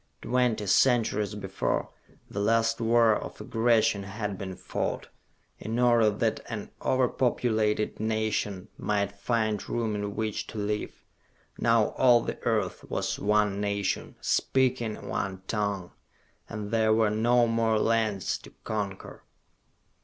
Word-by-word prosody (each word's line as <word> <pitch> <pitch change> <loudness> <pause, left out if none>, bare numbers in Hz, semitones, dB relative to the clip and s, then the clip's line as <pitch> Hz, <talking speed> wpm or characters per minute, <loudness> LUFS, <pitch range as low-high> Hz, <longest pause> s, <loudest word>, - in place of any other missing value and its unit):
Twenty 125 -4 +1
centuries 110 -2 +2
before, 95 -2 -2 0.4
the 100 - -5
last 115 +2 +2
war 115 -1 +4
of - - -6
aggression 115 -2 +2
had 100 +1 -4
been 95 -1 -6
fought, - - -3 0.5
in 110 +3 -3
order 120 -3 +4
that 110 +2 0
an 110 -3 -5
over 130 -1 +2
populated 110 -4 0
nation 110 -3 -1
might 100 -1 0
find 110 0 -1
room 115 -2 -1
in 105 -1 -3
which 110 -2 -2
to - - -8
live. 105 0 -3 0.5
Now 115 -2 +3
all 120 -2 +4
the - - -5
earth 105 -5 0
was - - -2
one 105 -1 +2
nation, 100 -1 -2
speaking 130 -4 0
one 95 -1 -3
tongue 100 -4 -2 0.6
and 105 -2 -5
there 110 -1 +3
were 110 -2 +3
no 120 +3 +3
more 115 -1 +1
lands 110 -3 0
to - - -13
conquer. 100 -3 -5
110 Hz, 130 wpm, -28 LUFS, 105-115 Hz, 0.6 s, war